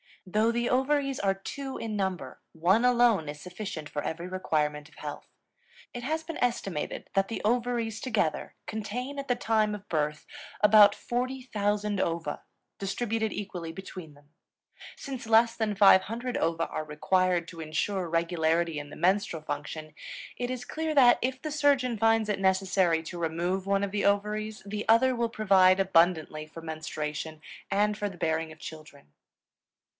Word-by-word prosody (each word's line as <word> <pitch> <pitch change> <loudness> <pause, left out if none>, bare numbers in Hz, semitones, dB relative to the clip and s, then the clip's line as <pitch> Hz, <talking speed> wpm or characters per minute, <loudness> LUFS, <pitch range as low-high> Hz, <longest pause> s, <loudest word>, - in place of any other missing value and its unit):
Though 215 +5 +2
the 240 +1 0
ovaries 275 +1 +1
are 195 -1 +2
two 265 +8 -6
in 220 -2 -4
number, 190 -9 -3
one 185 +9 +3
alone 240 -9 +4
is 150 0 -7
sufficient 180 -4 -6
for 145 0 -4
every 170 +2 -4
requirement 150 -5 -1
of - - -22
health. 150 -1 -7 0.7
It 245 - -6
has 315 +4 -1
been 330 0 -6
estimated 195 -10 -2
that 195 -1 +2
the 225 - -4
ovaries 230 -1 0
together 210 - -1
contain 245 +6 -4
at 275 - -5
the 245 - +2
time 220 -3 +1
of 205 0 -11
birth 150 -1 -1 0.4
about 210 -1 +7
40,000 215 -5 -2
ova, 165 -1 -2 0.4
distributed 220 +2 -1
equally 180 -5 -5
between 180 -3 -9
them. 145 0 -22 0.7
Since 265 -4 -7
less 230 +1 +5
than 215 -2 -1
500 215 +5 +4
ova 165 0 0
are 155 - -3
required 175 +3 +1
to 165 - -11
insure 170 +4 -2
regularity 165 -1 +1
in 145 0 -8
the - - -10
menstrual 185 -3 +1
function, 155 +1 -5 0.4
it 245 0 -2
is 255 -1 -4
clear 315 0 -3
that, 250 -4 +7
if 260 +1 -2
the 310 - -4
surgeon 280 -5 +2
finds 225 0 +3
it 205 - 0
necessary 190 -3 +2
to 175 +1 -7
remove 175 +3 -1
one 200 0 +2
of 200 - -2
the 205 0 -1
ovaries, 210 +1 0
the 210 +1 -4
other 255 +3 +5
will 235 -1 0
provide 195 -4 +4
abundantly 165 -4 +2
for 165 +1 -10
menstruation 155 -1 -5 0.3
and 210 +1 +1
for 205 -1 -2
the 190 - -11
bearing 160 -1 -1
of 155 - -13
children. 155 - -11
195 Hz, 160 wpm, -28 LUFS, 165-230 Hz, 0.7 s, about